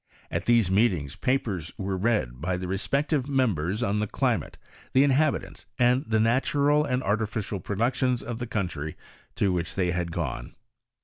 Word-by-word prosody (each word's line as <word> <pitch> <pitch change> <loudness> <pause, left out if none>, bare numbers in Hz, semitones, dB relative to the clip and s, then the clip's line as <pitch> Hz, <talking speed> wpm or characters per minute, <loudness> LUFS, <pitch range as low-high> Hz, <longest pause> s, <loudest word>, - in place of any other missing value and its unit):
At - - -2
these 115 -6 +4
meetings 95 - +2
papers 105 - -1
were 95 -1 -2
read, 90 - 0
by 90 +2 -1
the 90 0 -4
respective 140 - 0
members, 110 - +1
on 105 -1 +1
the 105 - 0
climate, - - -1 0.4
the 130 - +6
inhabitants, 145 +2 +1
and 125 +1 +3
the 110 0 +2
natural 140 +6 +3
and 130 -3 -1
arti 110 +2 +1
ficial 105 -2 -4
productions 125 +4 0
of 120 -1 -5
the 120 - -4
country 85 -8 -3 0.4
to 100 - +2
which 85 -1 -2
they 90 -3 +1
had 85 -1 -2
gone. - - -4
110 Hz, 165 wpm, -27 LUFS, 90-125 Hz, 0.4 s, the